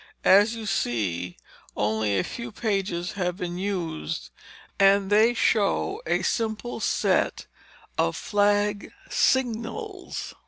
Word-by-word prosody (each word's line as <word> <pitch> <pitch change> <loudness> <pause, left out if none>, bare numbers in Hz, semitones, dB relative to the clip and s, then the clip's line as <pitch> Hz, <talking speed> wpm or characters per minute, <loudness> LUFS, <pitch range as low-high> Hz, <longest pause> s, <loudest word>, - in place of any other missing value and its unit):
As 205 +4 +6
you 225 -1 -6
see, 95 - -1 0.4
only 105 -1 +1
a 95 - +1
few 235 -1 -6
pages 195 -5 -2
have 180 -2 -2
been 180 -2 -4
used, 170 -5 -3 0.5
and 195 0 +4
they 220 +3 +5
show 235 - +1
a - - +1
simple 225 +1 -2
set - - +1 0.5
of - - +2
flag 205 0 +1 0.2
signals. 260 - -1
205 Hz, 110 wpm, -25 LUFS, 175-225 Hz, 0.5 s, As